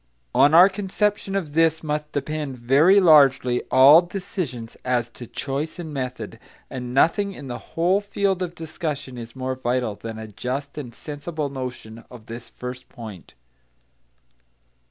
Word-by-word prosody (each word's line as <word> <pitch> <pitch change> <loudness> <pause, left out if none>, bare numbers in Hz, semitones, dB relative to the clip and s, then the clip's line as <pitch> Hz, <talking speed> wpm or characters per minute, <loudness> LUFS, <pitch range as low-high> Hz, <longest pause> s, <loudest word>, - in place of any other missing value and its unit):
On 145 +3 +5
our 180 +3 +9
conception 200 0 -1
of 165 -7 -3
this 160 0 +2
must 150 0 -3
depend 145 -1 -3
very 140 +11 +5
largely 140 -8 +5
all 140 +5 +8
decisions 175 - -5
as 120 -2 0
to 120 0 -10
choice 140 +6 -4
and 160 -4 -7
method; 125 -5 -5 0.3
and 125 -1 -5
nothing 195 +9 +2
in 140 -7 -9
the 120 - -5 0.2
whole 180 +4 +3
field 200 -2 -1
of 175 -1 -3
discussion 155 -5 -5
is 115 0 -9
more 130 0 -3
vital 125 -3 -1
than 110 +2 -8
a 110 - -7
just 130 +7 -5
and 125 -6 -7
sensible 150 0 -5
notion 125 -4 -7
of 120 -3 -13
this 115 +1 -9
first 125 0 -8
point. 110 -8 -11
140 Hz, 150 wpm, -23 LUFS, 125-165 Hz, 0.3 s, our